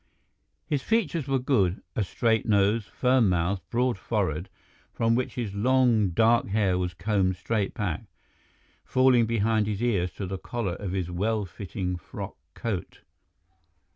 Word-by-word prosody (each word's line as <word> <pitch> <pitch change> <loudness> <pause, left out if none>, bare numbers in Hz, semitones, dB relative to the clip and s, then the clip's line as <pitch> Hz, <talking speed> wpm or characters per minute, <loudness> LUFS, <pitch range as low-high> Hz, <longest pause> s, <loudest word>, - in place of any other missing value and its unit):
His 145 -3 -1
features 170 - 0
were 135 -1 +2
good—a 110 -6 0
straight 110 +4 0
nose, 105 +1 +3
firm 125 -2 +2
mouth, 90 +2 0
broad 120 -3 0
forehead, 95 -5 -1 0.4
from 115 0 +1
which 125 +2 -1
his 115 -5 -3
long, 120 -1 +3
dark 115 +6 +3
hair 100 -3 +1
was 90 0 -2
combed 95 0 +1
straight 100 +2 -2
back, 90 -7 -2 0.8
falling 130 -3 +4
behind 110 -1 +1
his 105 +1 -2
ears 95 -7 +1
to 100 - -5
the 95 0 -4
collar 115 -6 -3
of 95 0 -5
his 90 -2 -2
well 105 +4 0
fitting 90 0 -4
frock - - -8 0.2
coat. 110 -7 -4
105 Hz, 140 wpm, -27 LUFS, 95-120 Hz, 0.8 s, falling